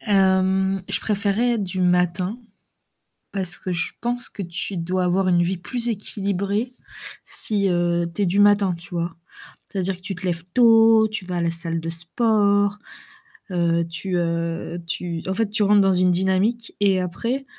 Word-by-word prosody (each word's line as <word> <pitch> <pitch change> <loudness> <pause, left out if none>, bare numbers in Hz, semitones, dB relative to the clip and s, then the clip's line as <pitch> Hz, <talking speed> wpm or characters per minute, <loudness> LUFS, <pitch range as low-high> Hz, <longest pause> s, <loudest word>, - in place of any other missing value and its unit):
Hem, 190 -1 +2
je 195 - +4
préférais 210 +3 +1
être 220 -3 -1
du 185 0 -4
matin 180 +4 +1 0.9
parce 190 -3 -3
que 185 - -4
je 175 -1 0
pense 245 +1 +1
que 200 - -7
tu 175 +2 -5
dois 180 +2 -1
avoir 185 +2 +1
une 175 -1 +3
vie 180 +2 -1
plus 240 +7 -3
équilibrée 200 +2 -2 0.5
si, 200 -2 -1
heu, 175 -1 +1
tu 205 - -1
es - - +2
du 185 +3 0
matin, 205 -2 +4
tu 170 - -10
vois? 170 -1 -3 0.5
C'est-à-dire 190 -1 -2
que 180 - -16
tu 195 0 -4
te 185 - -9
lèves 165 -2 -2
tôt, 225 -2 +6
tu 215 -2 -5
vas 180 -1 -4
à - - -1
la 170 - +1
salle 165 0 -4
de 165 - -6
sport, 205 +3 +1 0.7
heu, 170 -1 +1
tu 175 +2 -3
heu, 170 0 -2
tu 170 -1 -3
en 190 - 0
fait 220 +1 -1
tu 215 +1 +1
rentres 205 0 +5
dans 195 -1 +3
une 180 0 +3
dynamique 190 +6 0
et 195 -2 +3
après, 235 +10 -3
190 Hz, 175 wpm, -22 LUFS, 175-205 Hz, 0.9 s, tôt